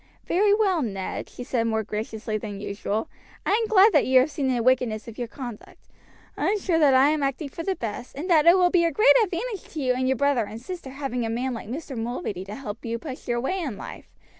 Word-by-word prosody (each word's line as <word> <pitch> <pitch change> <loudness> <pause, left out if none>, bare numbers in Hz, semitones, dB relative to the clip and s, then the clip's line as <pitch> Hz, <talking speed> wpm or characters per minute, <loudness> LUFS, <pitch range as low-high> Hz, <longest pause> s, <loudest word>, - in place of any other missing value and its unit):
"Very 405 +4 +3
well, 400 -5 +3
Ned," 195 -7 -4
she 245 - -8
said 240 -2 0
more 220 -1 0
graciously 215 +1 -4
than 210 -2 -5
usual, 205 +5 -3 0.4
"I - - +1
am 445 +2 +2
glad 420 0 +6
that 295 - +4
you 260 0 +6
have 290 +4 -1
seen 280 -3 -2
the 245 -3 +1
wickedness 240 -4 +1
of 230 0 -9
your 240 - -2
conduct. 240 -3 -10 0.5
I - - -1
am 425 - +2
sure 360 -4 +1
that 285 -4 +5
I 265 +2 +6
am 305 -1 0
acting 275 +2 -2
for 330 - -7
the 380 +3 -1
best, 235 -1 -6
and 300 +6 -5
that 330 -3 +4
it 345 +2 +8
will 360 -1 +4
be 350 -2 +4
a 335 - +2
great 430 - +6
advantage 405 +1 -4
to 315 - -4
you 255 -3 +2
and 255 +1 -1
your 265 0 +1
brother 280 -4 +2
and 220 +2 -8
sister 340 +2 -7
having 265 -3 -3
a 225 - -2
man 250 +3 -2
like 225 -2 -7
Mr. 275 +1 -6
Mulready 225 - -4
to 205 +2 -7
help 220 -5 -7
you 230 0 -2
push 265 +1 -8
your 240 -1 0
way 370 +10 -1
in 275 - -4
life. - - -9
260 Hz, 250 wpm, -25 LUFS, 230-330 Hz, 0.5 s, it